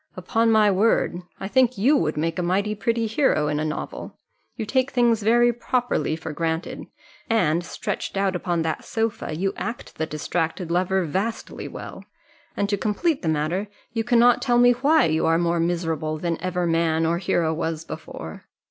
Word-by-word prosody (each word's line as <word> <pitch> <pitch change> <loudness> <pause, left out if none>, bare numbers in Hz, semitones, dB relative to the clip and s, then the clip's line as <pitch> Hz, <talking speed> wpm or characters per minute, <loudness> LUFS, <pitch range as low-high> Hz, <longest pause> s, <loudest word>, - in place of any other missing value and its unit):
"Upon 225 +5 +1
my 215 -2 +5
word 195 -3 +2 0.2
I 195 - -4
think 255 +1 +2
you 255 +10 +4
would 155 - 0
make 165 +3 -1
a - - +1
mighty 195 +4 0
pretty 230 +2 0
hero 220 - +2
in 150 0 -1
a - - -1
novel; 155 -1 -5 0.4
you 225 - -4
take 260 +4 +1
things 235 -4 +2
very 240 +3 +4
properly 245 -6 -1
for 160 -1 -6
granted, 160 +1 -3 0.4
and, 175 -7 +2
stretched 185 - -4
out 195 -1 +1
upon 175 -2 -1
that 160 -1 -2
sofa, 225 -8 -2
you 195 +3 -1
act 235 -6 -6
the 160 - -1
distracted 165 +3 -2
lover 185 +2 +1
vastly 195 +9 -3
well - - -9 0.5
and 200 - +1
to 205 - +1
complete 265 - 0
the 165 - -1
matter, 160 +6 -1 0.3
you 225 -1 0
cannot 240 +1 +4
tell 245 -2 +2
me 245 0 +6
why 280 - +3
you 160 0 +1
are 165 0 +4
more 170 0 +1
miserable 165 -2 -1
than 165 +1 -2
ever 180 0 -1
man 165 -1 +1
or 170 +1 +1
hero 170 -3 +1
was 160 0 -3
before. 80 - -8
185 Hz, 180 wpm, -24 LUFS, 165-225 Hz, 0.5 s, me